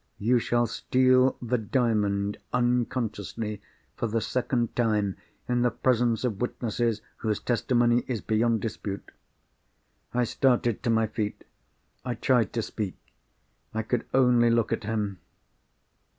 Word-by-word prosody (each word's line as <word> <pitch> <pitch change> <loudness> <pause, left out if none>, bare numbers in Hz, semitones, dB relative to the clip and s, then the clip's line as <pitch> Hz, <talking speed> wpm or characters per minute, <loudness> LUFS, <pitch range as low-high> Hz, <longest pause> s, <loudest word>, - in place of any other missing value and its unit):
"You 120 +4 +3
shall 120 +1 +1
steal 130 +3 +3
the 120 +1 0
Diamond, 105 -4 0
unconsciously, 115 -3 -1 0.3
for 115 - -1
the 115 +1 0
second 120 0 -1
time, 105 -5 +1 0.3
in 125 0 +1
the 125 - +4
presence 120 0 +1
of 110 -5 -2
witnesses 115 -2 -1
whose 110 -2 -1
testimony 120 0 +2
is 125 -4 -2
beyond 110 +1 +1
dispute." 100 -3 -5 1.0
I 125 0 +1
started 120 -2 +1
to 120 - -1
my 115 -1 +3
feet. 105 -1 -4 0.6
I 125 -1 -2
tried 120 0 +2
to 115 - -1
speak. 105 -4 -4 0.8
I 110 - 0
could 120 +2 -2
only 125 -2 +4
look 115 -1 +2
at - - -3
him. 105 -4 -2
115 Hz, 130 wpm, -27 LUFS, 110-125 Hz, 1.0 s, the